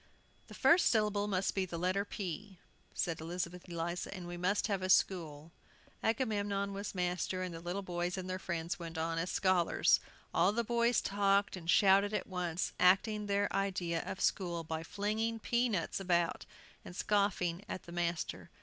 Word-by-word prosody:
"The - - -11
first 345 +1 +5
syllable 210 -2 +2
must 195 -1 0
be 195 - 0
the 175 -2 -5
letter 185 +3 +1
P," 195 -1 -6 0.4
said 165 -2 -1
Elizabeth 175 +2 -5
Eliza, 170 +1 -3
"and 185 -3 -7
we 175 0 -6
must 185 +4 +1
have 200 -3 -1
a 185 - -2
school." 165 -5 +2 0.5
Agamemnon 205 -4 0
was 200 0 -5
master, 180 +1 -1
and 180 -2 -4
the 165 - -6
little 175 +4 -4
boys 175 0 -2
and 185 -1 -4
their 185 0 -3
friends 170 -2 -3
went 165 -1 -6
on 165 +1 -1
as 175 +2 -2
scholars. 185 -3 +3 0.3
All 200 - +4
the 235 +2 0
boys 235 +1 +2
talked 200 0 +2
and 170 -2 -8
shouted 200 +2 +5
at - - -1
once, 180 -2 -2
acting 205 +3 +3
their 200 0 +1
idea 185 -4 0
of - - -5
a - - -8
school 170 -3 0
by 160 0 -4
flinging 215 +6 -1
pea 240 +2 +1
nuts 185 -5 -1
about, 175 -3 0 0.4
and 175 - -10
scoffing 200 -3 +1
at - - -5
the 170 - -11
master. 170 -1 -2
185 Hz, 175 wpm, -34 LUFS, 175-200 Hz, 0.5 s, first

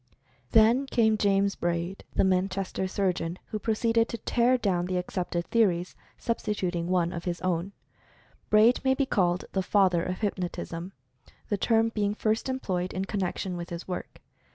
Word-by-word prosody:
Then 230 +5 +5
came 220 -4 +3
James 200 -1 +2
Braid, 175 +2 -2
the - - +3
Manchester 190 0 0
surgeon, 180 -3 -1
who 215 - -3
proceeded 225 +1 +1
to 235 - -4
tear 240 +3 +2
down 180 -6 0
the 185 0 -1
accepted 180 -1 -2
theories, 185 -6 +1 0.2
sub 230 -1 -2
stituting 180 -5 -2
one 175 -1 +1
of 170 - -6
his 175 -1 -2
own. 185 +1 -1 0.8
Braid 215 +3 +5
may 265 0 +3
be 275 - +1
called 180 -7 +1
the 190 - 0
father 185 -3 +3
of 185 +3 -4
"Hypnotism," 180 -2 -3 0.6
the 205 - +1
term 225 +2 +2
being 210 -2 -1
first 220 +4 0
employed 185 -9 -2
in 190 +1 -2
connection 190 -2 -2
with 175 0 -6
his 170 0 -6
work. 180 - -6
190 Hz, 160 wpm, -28 LUFS, 180-220 Hz, 0.8 s, Then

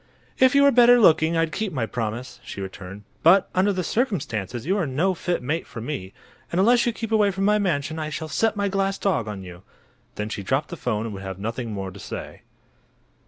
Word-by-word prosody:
"If 260 +1 +5
you 280 - +6
were 280 - +6
better 245 0 +7
looking 160 -4 +4
I'd 165 -1 +1
keep 210 +1 -2
my 125 -6 -1
promise," 115 +2 -5
she - - -8
returned. 95 +1 -8 0.2
"But 185 +4 +5
under 190 +2 +3
the 185 -2 -2
circumstances 130 - -2
you 190 +4 +1
are 185 -7 0
no 160 +9 +1
fit 175 -3 -2
mate 155 +6 -2
for - - -8
me, 110 -6 -5 0.4
and 170 - 0
unless 235 +5 +4
you - - +3
keep 225 -1 -6
away 210 -2 +4
from 195 0 -1
my 210 +1 +3
mansion 160 -5 -1
I 155 -1 -3
shall 155 +1 -5
set 220 +7 +1
my 200 -1 0
glass 195 0 0
dog 185 - 0
on 100 -3 -6
you!" 90 -1 -11 0.5
Then 105 - -3
she 105 - -4
dropped 135 +9 -1
the - - -5
'phone 110 -3 -2
and 110 - -5
would 95 - -7
have 95 -1 -6
nothing 115 +3 -4
more 95 -2 -4
to 100 - -12
say. - - -7
160 Hz, 225 wpm, -24 LUFS, -, 0.5 s, better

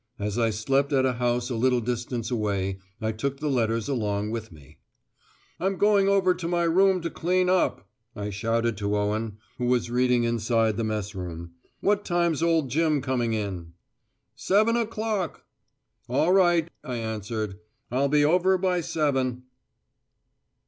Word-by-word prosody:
As 105 +2 -2
I 115 -1 +3
slept 135 +7 0
at 130 -1 +3
a 130 - +2
house 120 +1 -1
a - - -1
little 125 +2 +2
distance 120 0 -3
away, 100 -4 -1 0.2
I 110 0 -1
took 135 +5 -3
the 150 -1 -1
letters 115 -3 0
along 105 -5 -1
with 115 -2 -5
me. 75 -5 -17 0.8
"I'm 190 +1 -1
going 205 -1 +4
over 190 -2 +3
to 175 -1 -5
my 175 0 +1
room 185 +2 +3
to 165 -1 -3
clean 180 +2 +1
up," 185 - +1 0.3
I 105 -1 -4
shouted 115 +2 0
to 105 0 -1
Owen, 105 +1 -2 0.2
who 125 - -1
was 120 -1 +1
reading 125 0 +2
inside 115 -1 +1
the 115 - -2
Mess 105 -1 -3
room. 85 -3 -6 0.3
"What 205 0 +2
time's 170 -4 0
old 165 -6 +2
Jim 155 +1 +2
coming 125 -3 0
in?" 95 -6 -4 0.6
"Seven 215 +4 +2
o'clock!" 220 - -2 0.6
"All 155 +8 +2
right," 175 -4 +4 0.2
I 125 - -4
answered. 110 -2 -4 0.3
"I'll 135 +3 +1
be 145 0 +4
over 185 +4 +3
by 180 -1 0
seven." 130 -6 -1
125 Hz, 155 wpm, -26 LUFS, 110-170 Hz, 0.8 s, going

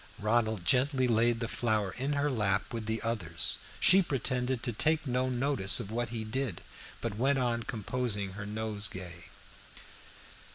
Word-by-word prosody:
Ronald 110 -3 0
gently 130 +2 +3
laid 115 0 +2
the 115 - -1
flower 110 -5 0
in 135 +4 -2
her 145 0 0
lap 105 -5 0
with 115 -2 -4
the 110 0 -2
others. 90 -8 0 0.2
She 195 - +7
pretended 130 -5 -1
to 120 - -2
take 155 +8 +1
no 130 0 0
notice 125 -6 +3
of 100 - -6
what 120 +1 -2
he 115 -1 -4
did, 120 -2 -3 0.4
but 110 -3 -4
went 135 +4 +2
on 120 -2 0
composing 110 -2 -2
her 100 +2 -7
nosegay. 100 -5 -2
115 Hz, 155 wpm, -30 LUFS, 105-130 Hz, 0.4 s, She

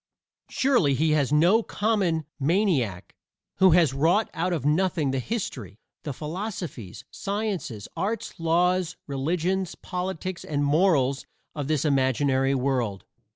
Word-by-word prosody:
Surely 240 - +2
he 155 +3 +2
is 145 -3 +1
no 175 +9 +5
common 200 -9 0
maniac 140 - 0 0.4
who 190 -1 +6
has 165 -5 +4
wrought 170 +10 +2
out 180 +3 -1
of 155 -6 -2
nothing 155 -2 +1
the 135 - -1
history, 125 - -4 0.2
the 150 - -5
philosophies, 160 - -6
sciences, 195 - -3
arts, 195 +5 -3
laws, 175 +2 +1
religions, 170 +6 -1
politics 185 0 -4
and 145 -1 -1
morals 145 -4 +2 0.3
of 145 -3 -4
this 155 -1 0
imaginary 135 -1 +2
world. 125 -7 -1
160 Hz, 120 wpm, -25 LUFS, 135-185 Hz, 0.4 s, who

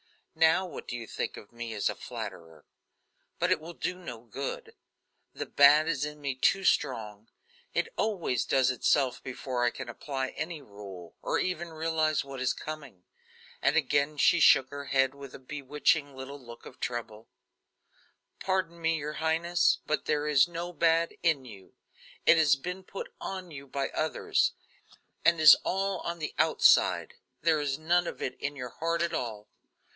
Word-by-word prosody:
Now 160 +3 +4
what 180 - -8
do 120 - -4
you 120 -1 -6
think - - -4
of 100 - -12
me 120 -1 -6
as 105 - 0
a - - 0
flatterer? 80 -3 -8 0.7
But - - +1
it - - +3
will 165 +2 -9
do 180 - -3
no 120 -11 -8
good; 130 +4 -6 0.6
the - - -4
bad 145 +2 +6
is 145 -4 0
in 150 0 -7
me 140 -2 -2
too 195 +9 +2
strong; 110 - 0 0.5
it - - +1
always 180 - 0
does 130 -1 +3
itself 130 0 +1
before 125 -1 -3
I 120 - +4
can 125 0 -8
apply 135 +2 -4
any 160 0 -5
rule, 100 - -11
or - - 0
even 175 -2 -2
realize 160 -1 0
what 135 -1 -7
is 130 -1 +1
coming." 145 -12 -8 0.6
And 135 +3 +3
again 145 0 +1
she 175 - +4
shook 135 -4 +6
her 145 0 -6
head 135 -1 +2
with 140 -2 -10
a - - -10
bewitching 145 +1 0
little 135 +2 -8
look 120 -2 -12
of - - -12
trouble. 115 -2 -5 1.1
"Pardon 185 -3 -1
me, 165 0 +2
your 150 0 -4
highness; 165 +2 +2
but 155 - -1
there 150 0 0
is 150 +1 +5
no 175 +1 -5
bad 165 0 +2
in 155 -6 +1
you. 100 -6 -13 0.5
It 165 - +7
has 150 -3 +5
been 180 +7 -6
put 195 - -8
on 185 -2 -5
you 140 -2 -9
by 135 +1 -2
others, 155 0 0 0.7
and 170 -1 +4
is 155 - +11
all 195 0 -1
on 170 +1 -4
the 155 -2 -4
outside; - - +4 0.3
there 160 -2 +3
is 140 -2 -1
none 170 +3 +2
of - - -6
it 130 - -3
in 145 +1 -3
your 125 -3 -6
heart 165 +6 -1
at 170 -1 -2
all. 110 -7 -4
145 Hz, 175 wpm, -29 LUFS, 130-165 Hz, 1.1 s, is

